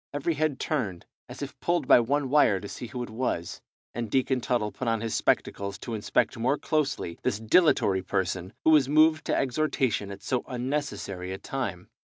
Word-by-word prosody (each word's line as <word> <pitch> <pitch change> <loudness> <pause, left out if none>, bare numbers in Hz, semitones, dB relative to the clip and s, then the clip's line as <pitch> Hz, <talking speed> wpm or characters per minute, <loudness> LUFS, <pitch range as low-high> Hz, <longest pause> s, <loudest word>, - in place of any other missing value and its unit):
Every 145 +4 0
head 155 -2 -1
turned 105 - -2 0.2
as - - -7
if - - -8
pulled 170 -6 0
by - - +8
one 135 +3 0
wire 140 -10 +4
to 100 - -8
see 120 - -7
who 125 0 -5
it - - -7
was, 110 -8 -3 0.3
and 115 -1 -4
Deacon 130 +1 +1
Tuttle 115 -4 0
put 130 - -5
on 115 -1 +1
his 115 0 -3
spectacles 100 -1 0
to 120 - -6
inspect 105 -2 0
more 130 +5 +2
closely 145 - -1
this 100 - -1
dilatory 110 - +3
person, 95 -1 -2
who 160 - +6
was 145 -4 +5
moved 155 +1 +4
to - - +1
exhortation 130 -6 0
at 100 - -9
so 125 - -1
unnecessary 125 -8 -3
a 95 - -4
time. 100 -8 -4
125 Hz, 190 wpm, -27 LUFS, 100-145 Hz, 0.3 s, by